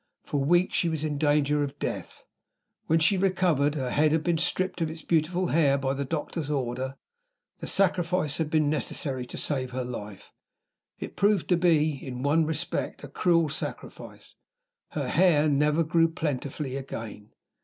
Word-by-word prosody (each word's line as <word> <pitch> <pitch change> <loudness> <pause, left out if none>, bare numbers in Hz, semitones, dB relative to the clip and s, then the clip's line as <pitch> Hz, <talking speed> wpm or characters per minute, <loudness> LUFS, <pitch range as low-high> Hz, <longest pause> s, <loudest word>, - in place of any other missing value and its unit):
For 145 -2 -2
weeks 175 +5 +2
she 170 - +2
was 160 -2 -2
in 150 -2 -2
danger 150 -1 +2
of 140 -1 -3
death. - - -5 0.6
When 160 - +3
she 185 +4 +3
recovered, 175 -6 +2
her 130 -4 -2
head 150 +1 +3
had 160 0 +1
been 170 -2 +1
stripped 185 +2 0
of 160 - 0
its 160 -1 -9
beautiful 175 +3 +1
hair 145 -3 +3
by 135 -1 -1
the 140 +1 -2
doctor's 150 +1 -4
order. 130 -1 -2 0.6
The - - -6
sacrifice 180 -5 +1
had 160 -2 -1
been 155 -1 +2
necessary 135 -3 -1
to - - -8
save 130 -4 -1
her 130 0 -2
life. 105 -5 -8 0.6
It - - -7
proved 205 -3 +2
to 180 - +5
be, 160 -3 +3
in 125 -1 -6
one 155 +3 +2
respect, 160 -1 -3
a - - -6
cruel 165 +3 +2
sacrifice 145 - -7 0.6
her - - -2
hair 160 -5 +4
never 150 +2 +2
grew 165 +1 +3
plentifully 145 -4 -3
again. 115 -6 -8
150 Hz, 165 wpm, -27 LUFS, 140-165 Hz, 0.6 s, to